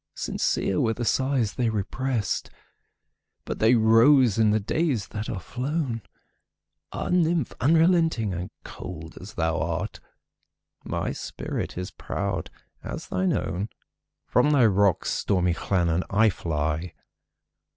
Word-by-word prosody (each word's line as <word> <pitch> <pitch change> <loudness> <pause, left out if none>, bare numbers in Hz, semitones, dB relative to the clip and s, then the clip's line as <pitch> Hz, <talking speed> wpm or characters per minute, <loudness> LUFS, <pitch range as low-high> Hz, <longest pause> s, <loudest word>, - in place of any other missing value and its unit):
Sincere 95 - 0
were 110 -2 +1
the 120 - -3
sighs 130 -4 +1
they 120 -2 0
represt, 110 0 -2 1.0
But - - -4
they 115 +3 +5
rose 115 +1 +5
in 110 -1 +5
the 105 +1 +3
days 120 - -1
that 110 +1 -5
are 100 - -3
flown! 125 - -3 0.9
Ah, - - -4
nymph! 170 -5 +2
unrelenting 160 - +3
and 90 +1 -4
cold 80 0 -8
as 100 +3 -10
thou 80 -1 0
art, - - -3 0.8
My - - -2
spirit - - -5
is 90 0 -4
proud - - -3 0.3
as - - -6
thine 95 0 +1
own! 95 +5 -2 0.6
From 125 +5 +3
thy 140 -5 +5
rocks, 100 -3 +3
stormy 90 -3 +1
Llannon, 85 -1 0
I 110 +1 +4
fly. 80 0 -2
110 Hz, 125 wpm, -26 LUFS, 95-130 Hz, 1.0 s, they